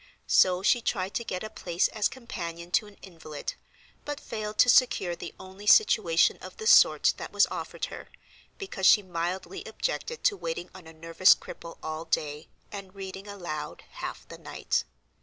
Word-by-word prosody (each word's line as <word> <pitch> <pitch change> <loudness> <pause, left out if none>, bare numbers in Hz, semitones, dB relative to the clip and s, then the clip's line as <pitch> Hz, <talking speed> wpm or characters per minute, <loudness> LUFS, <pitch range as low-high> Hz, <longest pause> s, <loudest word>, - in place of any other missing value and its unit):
So 185 0 +4
she 240 +4 +4
tried 195 -4 -2
to 235 - -2
get 185 -4 -4
a 215 - -5
place 175 -4 0
as 210 -1 +1
companion 175 -9 -7
to 210 - +2
an 205 - -16
invalid, 160 -5 -7 0.5
but 290 -1 -5
failed 215 -1 -6
to - - +6
secure 220 -8 +4
the 170 0 -8
only 190 +2 -11
situation 205 - +5
of - - -10
the 440 - -7
sort - - +6
that - - -7
was - - +5
offered - - -4
her, - - -10 0.5
because 380 - -1
she 210 - +7
mildly 175 +1 -4
objected 485 -1 -4
to 410 - +3
waiting 175 - -5
on 185 -3 -13
a - - -10
nervous 165 +3 +4
cripple 165 - -10
all 160 +1 -4
day, 150 -1 -2 0.2
and 195 -1 -9
reading 195 +1 -8
aloud 175 -7 -6
half - - -7
the - - -11
night. - - -2
185 Hz, 175 wpm, -28 LUFS, 170-210 Hz, 0.5 s, she